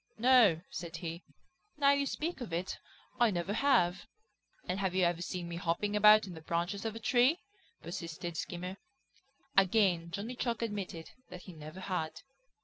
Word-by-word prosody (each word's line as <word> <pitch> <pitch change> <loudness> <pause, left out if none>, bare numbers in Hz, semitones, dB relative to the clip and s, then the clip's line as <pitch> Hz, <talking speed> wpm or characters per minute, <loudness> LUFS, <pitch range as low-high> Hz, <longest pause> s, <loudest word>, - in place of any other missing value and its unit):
"No," 230 -8 +6
said 170 -1 -6
he, 165 0 -5 0.6
"now 280 -1 +5
you 280 0 +2
speak 325 +1 -3
of 235 - -6
it, 175 +3 -3 0.4
I 240 -1 +5
never 180 0 -2
have." 200 -8 +2 0.6
"And 185 +2 -1
have 190 -2 -1
you 185 - +3
ever 175 0 0
seen 175 -1 -4
me 170 0 -5
hopping 190 +4 -1
about 210 0 +7
in 185 - -8
the 160 - -10
branches 170 +6 -2
of 220 -1 -2
a - - -5
tree?" 250 +7 +3 0.5
persisted 170 0 -5
Skimmer. 180 +4 -5 0.8
Again 190 -3 +3
Johnny 200 +8 -5
Chuck 235 -2 -2
admitted 195 -7 -5 0.2
that 180 - -9
he 185 - -10
never 155 +3 -9
had. 160 -5 -3
185 Hz, 165 wpm, -32 LUFS, 170-220 Hz, 0.8 s, about